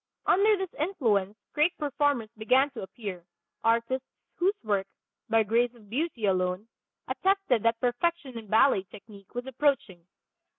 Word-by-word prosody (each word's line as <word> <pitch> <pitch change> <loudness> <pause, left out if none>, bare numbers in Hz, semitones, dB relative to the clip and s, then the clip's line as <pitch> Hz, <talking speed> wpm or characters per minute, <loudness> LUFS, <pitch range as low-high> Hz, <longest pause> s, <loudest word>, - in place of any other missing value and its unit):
Under 415 +3 +4
this 380 -2 -4
influence 220 - 0 0.2
great 325 +4 +2
performers 285 -6 0
began 255 +6 +3
to 260 - -7
appear, 190 -2 -7 0.4
artists 235 +3 +1 0.3
whose 380 +4 +1
work, 200 -3 0 0.4
by 225 0 +4
grace 235 +3 +1
of 215 -3 -19
beauty 265 -4 -1
alone, 185 +1 0 0.4
attested 385 - +1
that 230 +1 +1
perfection 265 +3 -1
in 225 -2 -7
ballet 220 +1 +4
technique 200 0 -14
was 245 +1 -3
approaching. 260 - -1
235 Hz, 135 wpm, -28 LUFS, 210-290 Hz, 0.4 s, Under